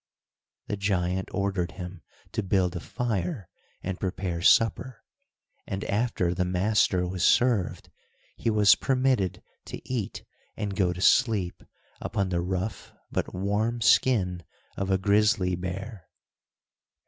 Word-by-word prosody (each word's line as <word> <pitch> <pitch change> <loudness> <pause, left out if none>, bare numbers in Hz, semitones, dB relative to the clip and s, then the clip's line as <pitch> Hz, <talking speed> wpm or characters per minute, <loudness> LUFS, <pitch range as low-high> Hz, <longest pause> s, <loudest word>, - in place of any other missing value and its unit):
The 105 - -3
giant 95 -2 -1
ordered 100 -3 -1
him 90 -2 -8 0.3
to 110 - -1
build 95 -2 +1
a - - -2
fire, 100 -5 -3 0.4
and 95 0 -4
prepare 90 -3 -3
supper, 115 +5 +3 0.6
and, 95 0 -3
after 105 -5 0
the 90 +1 0
master 90 0 +2
was 90 0 -3
served, 120 -7 +2 0.4
he - - -1
was 105 -3 +6
permitted 130 -8 0 0.2
to - - -7
eat 120 -6 -3 0.3
and 105 -3 -3
go 95 -3 +2
to 90 +1 -6
sleep 105 -7 +3 0.4
upon 100 -1 -1
the 85 -1 0
rough 95 +4 -4 0.2
but - - -2
warm 105 +5 0
skin 100 -7 +3 0.3
of 100 0 -3
a 95 - +3
grizzly 100 -1 +2
bear. 95 +2 -6
95 Hz, 125 wpm, -27 LUFS, 90-110 Hz, 0.6 s, was